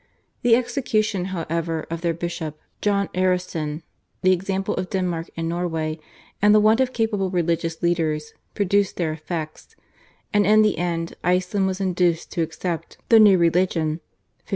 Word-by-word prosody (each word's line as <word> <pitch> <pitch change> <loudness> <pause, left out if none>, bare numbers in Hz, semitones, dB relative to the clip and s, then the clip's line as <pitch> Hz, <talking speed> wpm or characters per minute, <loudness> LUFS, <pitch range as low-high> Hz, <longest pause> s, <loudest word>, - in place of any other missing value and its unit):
The 235 -1 +5
execution, 225 -6 0
however, 165 -3 -3
of 165 0 -3
their 170 -2 0
bishop, 165 -2 -4 0.2
John 200 -2 +1
Aresen, 180 -4 -1 0.4
the 185 - +5
example 190 +1 -1
of 180 0 -3
Denmark 175 -3 -2
and 165 0 -2
Norway, 165 -2 -2 0.4
and 210 +1 +6
the - - +7
want 215 +3 +4
of 260 -1 +2
capable 220 -5 0
religious 170 -2 -1
leaders 155 -3 0 0.2
produced 200 0 +1
their 160 -3 0
effects, 155 0 -6 0.6
and 205 0 +4
in 215 +2 +5
the 210 -6 +1
end 170 -1 -2
Iceland 180 +2 +1
was 190 0 -2
induced 180 -3 0
to 170 - -1
accept 165 +1 -4
the 225 - +8
new 205 -3 +7
religion 170 -2 +1
(1551). - - -45
180 Hz, 155 wpm, -23 LUFS, 165-195 Hz, 0.6 s, the